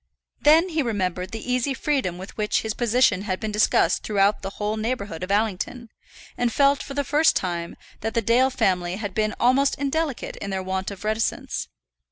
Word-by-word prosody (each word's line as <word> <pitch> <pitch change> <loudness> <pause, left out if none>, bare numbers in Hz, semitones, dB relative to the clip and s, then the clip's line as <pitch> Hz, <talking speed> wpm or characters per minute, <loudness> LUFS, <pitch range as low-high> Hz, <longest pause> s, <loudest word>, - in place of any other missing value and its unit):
Then 320 +5 +5
he 320 -2 0
remembered 185 -6 -2
the 225 +3 -5
easy 255 +2 0
freedom 260 - -1
with 190 +2 -9
which 210 -1 0
his 220 -1 -2
position 235 -5 +2
had 190 -2 -3
been 220 -2 -3
discussed 210 +1 +3
throughout 200 -1 +2
the 195 - -4
whole 210 +1 -1
neighbourhood 215 -6 -3
of 185 - -4
Allington, 220 +3 -1 0.5
and 245 -1 0
felt 280 +2 +3
for 275 - -7
the 285 - 0
first 300 +4 +3
time 170 -2 -2 0.2
that 225 0 -4
the 230 - +3
Dale 245 +5 +4
family 185 -8 0
had 205 -2 -5
been 215 +1 0
almost 260 +3 +3
indelicate 285 0 -2
in 200 - -5
their 190 -1 -2
want 190 0 -2
of 200 -1 -9
reticence. 215 +1 -2
220 Hz, 190 wpm, -24 LUFS, 195-255 Hz, 0.5 s, Then